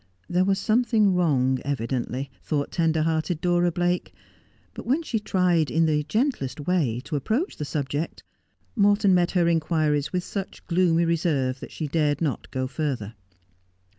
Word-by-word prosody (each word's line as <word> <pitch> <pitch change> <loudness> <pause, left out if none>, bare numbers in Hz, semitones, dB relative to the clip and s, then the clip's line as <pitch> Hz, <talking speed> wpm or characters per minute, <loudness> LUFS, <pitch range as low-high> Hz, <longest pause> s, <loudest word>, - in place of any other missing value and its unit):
There 180 +1 +2
was 195 0 +2
something 220 -2 +2
wrong, 130 -7 +2
evidently, 130 0 -3
thought 145 -2 -2
tender 160 -2 +1
hearted 160 +1 0
Dora 175 0 +2
Blake; 175 +1 -1 0.6
but - - -9
when 285 +7 +1
she 230 -8 -1
tried, 180 -6 +1
in 165 0 +2
the 150 -1 +2
gentlest 215 - -1
way, 145 -8 0
to 155 - -4
approach 225 - -1
the 150 - -4
subject, 145 +2 -3 0.5
Morton 205 -2 +4
met 175 -1 +3
her 175 -3 +3
inquiries 155 -3 +1
with 180 -1 -1
such 195 0 -6
gloomy 170 -1 +2
reserve 150 -6 0
that - - -9
she 155 - -4
dared 145 -1 +1
not 150 -5 -2
go 130 0 -2
further. 130 -6 -3
165 Hz, 155 wpm, -25 LUFS, 145-180 Hz, 0.6 s, Morton